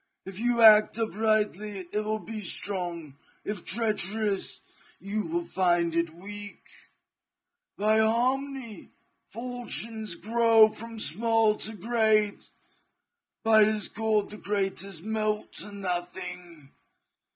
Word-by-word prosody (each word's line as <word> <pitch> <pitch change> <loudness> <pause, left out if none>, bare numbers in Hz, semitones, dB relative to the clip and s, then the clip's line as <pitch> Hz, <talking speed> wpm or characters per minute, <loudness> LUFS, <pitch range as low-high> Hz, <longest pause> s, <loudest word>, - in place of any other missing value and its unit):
If 195 0 -6
you 235 0 +2
act 215 0 +7
uprightly 215 -3 -1
it 210 - 0
will 215 0 -1
be 215 0 -7
strong, 175 -6 -4 0.3
if 205 -4 -4
treacherous, 210 -2 -1 0.4
you 210 +2 -3
will 345 +1 -2
find 175 - +1
it 170 0 +1
weak. 205 +3 -9 1.1
By 215 +2 +3
harmony, 250 +1 0 0.4
fortunes 230 -4 -4
grow 225 +2 +5
from 230 +1 -8
small 225 +3 +2
to 220 - -3
great; 215 -1 +1 0.9
by 220 -1 +6
discord 215 0 0
the 210 - -7
greatest 195 -3 -2
melt 215 0 -2
to 210 - -7
nothing. 175 -5 -5
215 Hz, 105 wpm, -27 LUFS, 195-225 Hz, 1.1 s, act